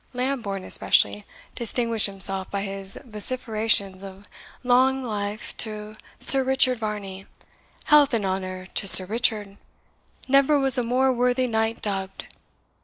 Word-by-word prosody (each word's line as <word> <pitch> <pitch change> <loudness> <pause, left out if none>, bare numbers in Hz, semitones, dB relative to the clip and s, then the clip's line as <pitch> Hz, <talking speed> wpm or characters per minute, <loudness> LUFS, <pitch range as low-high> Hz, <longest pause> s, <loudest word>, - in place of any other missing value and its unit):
Lambourne, 245 -7 -4
especially, 100 - +1 0.3
distinguished 230 -2 -1
himself 195 -1 0
by 200 -1 -4
his 195 -1 -2
vociferations 215 -4 -2
of 195 +1 -11 0.4
"Long 260 +2 +1
life 210 -2 -6
to 215 -1 -5 0.2
Sir 270 -1 +6
Richard 260 -2 +2
Varney! 200 -3 -7 0.6
Health 300 -2 +3
and 210 -3 -3
honour 185 -1 -5
to 200 - -1
Sir 185 0 +9
Richard! 210 -1 -2 0.7
Never 275 +2 +2
was 270 -2 +4
a - - -1
more 255 +3 0
worthy 250 +1 0
knight 225 -1 -3
dubbed!" 195 -2 -5
215 Hz, 125 wpm, -22 LUFS, 195-250 Hz, 0.7 s, Sir